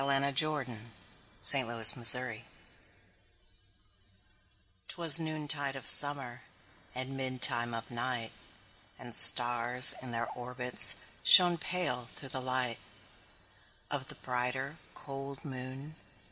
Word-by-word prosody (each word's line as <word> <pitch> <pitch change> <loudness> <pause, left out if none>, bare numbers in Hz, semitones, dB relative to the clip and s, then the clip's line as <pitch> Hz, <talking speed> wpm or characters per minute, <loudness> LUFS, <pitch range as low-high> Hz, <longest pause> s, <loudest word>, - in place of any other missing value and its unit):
1827 135 - -1
Evening 115 -1 -10 0.2
Star 125 0 0 2.5
'Twas 165 -2 +3
noontide 150 -3 -5
of 135 - -14
summer, 135 -4 +4 0.5
And 130 +1 -7
midtime 125 -3 -4
of 115 - -15
night, 120 -1 -8 0.7
And - - -12
stars, 120 +1 +5
in 130 - -10
their 115 0 -8
orbits, 125 0 0 0.3
Shone 175 -2 +4
pale, 155 -10 -7
through 135 - -12
the 130 - -7
light 125 -2 -7 1.1
Of 135 -2 -9
the - - -11
brighter, 130 +4 -10 0.2
cold 135 +1 -14
moon. 135 +2 -13
130 Hz, 95 wpm, -25 LUFS, 120-140 Hz, 2.5 s, stars